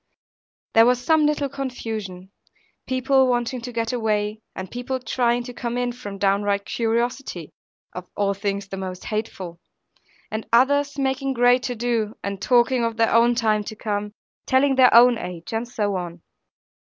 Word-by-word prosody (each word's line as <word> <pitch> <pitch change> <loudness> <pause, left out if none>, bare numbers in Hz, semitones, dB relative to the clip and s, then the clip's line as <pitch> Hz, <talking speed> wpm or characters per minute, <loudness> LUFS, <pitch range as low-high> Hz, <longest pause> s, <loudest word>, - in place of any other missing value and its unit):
There 225 +1 +7
was 250 0 +3
some 305 +4 +3
little 295 -1 0
confusion, 220 -9 -6 0.6
people 260 +1 +3
wanting 245 0 -1
to 245 +1 -6
get 230 0 -2
away, 215 -2 -1
and 190 -1 -7
people 250 +2 -3
trying 240 0 0
to 245 0 -8
come 240 0 -4
in, 245 0 0
from 205 -5 -8
downright 200 0 +1
curiosity 235 - -2 0.4
(of 180 0 -7
all 200 -1 +1
things 200 0 -3
the 195 - -5
most 185 -1 -6
hateful), 190 -5 -5 0.7
and 220 0 -4
others 285 +4 +3
making 270 0 -1
great 245 0 +4
to 245 - -3
do, 230 -2 -1
and 200 -1 -4
talking 245 +2 +3
of 230 -1 -2
their 225 -1 +2
own 235 +1 +4
time 215 -3 +1
to 220 - -6
come, 210 -1 -3 0.3
telling 270 +1 +3
their 260 -1 +6
own 240 0 +7
age, 175 +2 -7
and 225 +2 -2
so 205 -4 -1
on. 175 -2 -6
230 Hz, 165 wpm, -23 LUFS, 205-250 Hz, 0.7 s, There